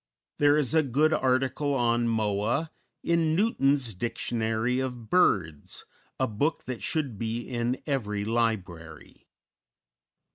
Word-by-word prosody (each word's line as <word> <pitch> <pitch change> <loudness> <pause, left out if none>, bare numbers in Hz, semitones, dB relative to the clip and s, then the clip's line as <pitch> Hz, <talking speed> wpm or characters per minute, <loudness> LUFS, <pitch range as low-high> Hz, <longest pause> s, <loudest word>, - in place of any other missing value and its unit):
There 145 0 +5
is 150 -2 +1
a 160 - +5
good 150 +3 +2
article 135 +1 +1
on 120 -2 +2
Moa 110 +7 0 0.3
in 165 -2 +2
Newton's 140 - +2
"Dictionary 115 +3 -1
of 125 -4 -5
Birds," 90 - +1 0.3
a 130 - +2
book 140 +9 -1
that 125 -5 -6
should 135 -3 -2
be 115 +1 -3
in 120 0 -1
every 105 -8 -2
library. 105 -8 -3
120 Hz, 115 wpm, -27 LUFS, 110-145 Hz, 0.3 s, There